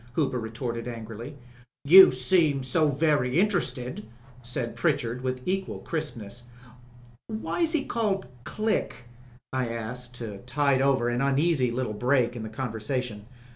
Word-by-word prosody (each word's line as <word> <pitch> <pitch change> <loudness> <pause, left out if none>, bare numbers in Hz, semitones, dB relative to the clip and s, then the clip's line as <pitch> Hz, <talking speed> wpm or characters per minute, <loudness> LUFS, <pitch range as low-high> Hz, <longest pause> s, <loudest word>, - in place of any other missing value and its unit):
Hooper 130 -3 0
retorted 115 +1 -4
angrily. 115 +3 -7 0.5
"You 190 +6 +10
seemed 140 +1 +2
so 155 +3 +2
very 145 -1 +2
interested," 175 -11 0 0.4
said 120 0 -4
Pritchard 125 -7 0
with 130 0 -4
equal 190 +1 -1
crispness. 120 -8 -5 0.8
"Why 220 +10 -3
was 330 -1 +2
he 295 -3 0
called 210 -5 -1 0.2
Click?" 215 - -2 0.5
I 130 -2 0
asked 120 +2 -6
to 110 -5 -6
tide 135 +2 +1
over 135 -3 +2
an 120 +1 -1
uneasy 140 -1 +2
little 120 -2 -2
break 125 +2 +1
in 120 - -5
the 110 - -5
conversation. 110 -2 -4
130 Hz, 135 wpm, -27 LUFS, 120-150 Hz, 0.8 s, You